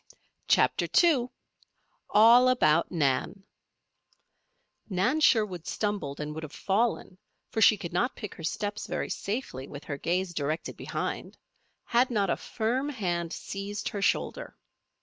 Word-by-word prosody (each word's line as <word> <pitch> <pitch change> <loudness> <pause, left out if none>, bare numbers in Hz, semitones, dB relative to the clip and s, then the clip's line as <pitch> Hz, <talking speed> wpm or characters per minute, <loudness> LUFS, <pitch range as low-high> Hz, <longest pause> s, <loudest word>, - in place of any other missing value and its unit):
CHAPTER - - +3 0.2
II 270 -8 +3 0.8
ALL 235 +4 +7
ABOUT 165 -10 +3
NAN 155 +5 0 1.5
Nan 200 +11 +1
Sherwood 210 - +2
stumbled 205 -10 -2
and 150 0 -4
would 160 - -6
have 155 -2 -8
fallen, 195 -1 -1 0.3
for 220 - -1
she 215 - +7
could 170 -3 -7
not 240 +9 0
pick 210 -4 -7
her 165 - -11
steps 205 +5 -3
very - - -3
safely 200 - -4
with 145 0 -9
her 140 -2 -5
gaze 180 +1 -1
directed 155 +1 -3
behind, - - -5 0.5
had 245 +2 +2
not 200 -6 +1
a - - +2
firm 250 +5 -2
hand 175 - -2
seized 200 +3 -5
her 200 - -5
shoulder. - - -1
200 Hz, 135 wpm, -28 LUFS, 165-230 Hz, 1.5 s, ALL